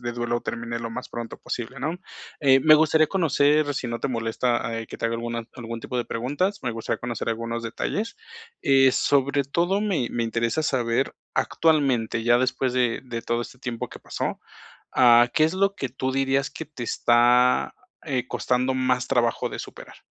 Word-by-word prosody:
de 120 0 -4
duelo 120 0 -2
termine 115 0 -4
lo 115 - -4
más 125 +3 -7
pronto 120 -1 -6
posible, 125 +3 -5
¿no?, 155 +7 -3 0.4
eh, 135 -2 +5
me 155 +2 +7
gustaría 155 0 +4
conocer, 150 -4 +2
si 130 - -3
no 115 0 -4
te - - -1
molesta, 115 -1 -1
eh, 115 - -7
que - - -9
te - - -6
haga 115 0 +1
alguna 115 0 -4
algún 115 -2 -6
tipo 125 - -4
de 120 - -2
preguntas, 145 - -1
me - - -1
gustaría 115 -1 -3
conocer 120 -1 -4
algunos 115 +1 -3
detalles, 205 - -3 0.5
eh, 135 -1 +5
sobre 140 +1 +2
todo, 175 +8 0
me 185 - 0
me 120 - -1
interesa 115 +5 0
saber, 125 -2 0 0.2
actualmente, 135 -9 +1
ya 120 +1 +4
después 130 0 0
de 125 -2 +1
de 115 -2 -5
todo 120 0 -1
este 125 +2 -11
tiempo 120 -3 -4
que - - -11
pasó, - - -4 0.5
ah, 120 0 +6
¿qué 155 - +4
es 160 +3 0
lo 195 +1 +2
que 135 -9 -3
tú 130 +1 -3
dirías 135 +1 +1
que 160 - -7
te 145 -4 -9
está, 120 - +3 0.3
eh, 125 -3 -2
costando 130 +1 0
más 130 -1 0
trabajo 120 -1 +1
de - - -7
superar? - - -10
125 Hz, 190 wpm, -24 LUFS, 115-140 Hz, 0.5 s, me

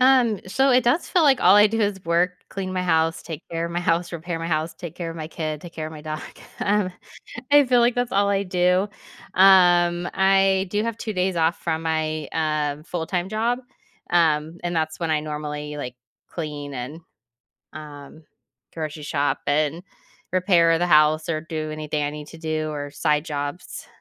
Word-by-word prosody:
Um, 250 -5 +4
so 265 +8 +2
it 250 -1 +4
does 290 +8 +2
feel 350 - +3
like 275 -4 +4
all 205 - +7
I 210 +1 +8
do 225 +1 -2
is 200 -3 -1
work, 170 +2 +2 0.2
clean 190 -1 -4
my 185 -1 -1
house, 160 -1 +1
take 160 -1 -7
care 165 0 -2
of 170 - -7
my 175 - -1
house, 175 0 0
repair 170 0 -4
my 165 - -4
house, 160 0 -1
take 170 -3 -8
care 170 -2 -5
of 165 - -8
my 155 -1 -5
kid, 155 -2 -4
take 175 -1 -11
care 155 -1 -5
of 155 - -8
my 150 - -10
dog. 155 0 -5 0.4
Um, 200 -3 +1 0.6
I 290 0 +7
feel 245 -1 +3
like 240 +1 +3
that's 245 0 -1
all 200 -1 +2
I 200 0 +1
do. 180 +1 +1 0.5
Um, 175 -2 +5
I 195 0 +3
do 210 +2 0
have 230 -1 -3
2 215 -2 -4
days 185 -1 0
off 165 +2 +2
from 160 -1 -2
my, 155 -2 -1
uh, 150 -2 -1
full-time 175 +2 -3
job, 230 +3 0 0.5
um, 160 -1 +2
and 175 -1 -2
that's 160 0 -1
when 165 -2 -1
I 155 -1 +1
normally, 150 -1 -5
like, 125 -3 -6 0.3
clean 145 -4 -6
and, 130 +5 -6 0.7
um, 150 0 -11 0.5
grocery 155 -2 -5
shop 145 -1 -1
and 150 +3 0 0.5
repair 175 -3 +4
the 175 - +1
house 155 0 +4
or 155 -2 -1
do 155 -2 -5
anything 155 -1 -3
I 145 - -2
need 150 0 -8
to 165 - -12
do 155 -1 -2
or 145 -1 -5
side 150 0 0
jobs. 145 +2 -5
165 Hz, 195 wpm, -23 LUFS, 155-190 Hz, 0.7 s, I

